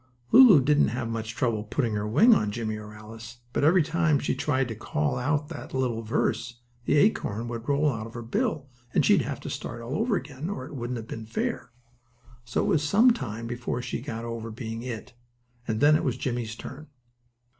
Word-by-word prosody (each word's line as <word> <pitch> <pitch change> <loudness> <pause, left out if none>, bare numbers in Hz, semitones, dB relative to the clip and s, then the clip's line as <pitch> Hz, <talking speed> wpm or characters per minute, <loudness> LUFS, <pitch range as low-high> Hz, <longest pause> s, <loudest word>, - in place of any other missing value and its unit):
Lulu 230 - +9
didn't 150 +2 +4
have 120 +1 -3
much 115 0 -4
trouble 115 -4 0
putting 115 +1 -1
her 105 0 -1
wing 205 - +6
on 105 - +2
Jimmie 110 0 -3
or 105 0 -9
Alice, 110 +2 -11 0.2
but, - - 0
every 170 +3 +5
time 165 -1 +2
she 140 - -1
tried 135 -1 0
to 115 - -4
call 75 -8 -1
out 145 +3 0
the - - -7
little 120 -3 0
verse 115 +1 -1 0.3
the 145 - +2
acorn 120 - +2
would 115 +2 -5
roll 145 +2 +3
out 115 -6 -2
of 115 - -13
her 120 - -5
bill 155 - -1 0.3
and - - +4
she'd - - +5
have - - -4
to - - -6
start 120 - -5
all 115 +3 -6
over 220 +6 +1
again, 145 0 -5
or 165 -11 -4
it - - -10
wouldn't 125 -2 -4
have 110 -1 -7
been 115 -1 -7
fair. 115 - -3 0.8
So 120 - -1
it - - -1
was 155 - +3
some 215 +11 +5
time 115 - -4
before 120 +1 -3
she - - -4
got 115 0 -5
over 115 -1 -5
being 115 0 -6
"it," 120 -2 -6 0.5
and 110 -1 -1
then 150 +1 +6
it 155 - +1
was 125 -3 -1
Jimmie's 120 -3 -3
turn. 140 +6 -9
120 Hz, 210 wpm, -27 LUFS, 115-145 Hz, 0.8 s, Lulu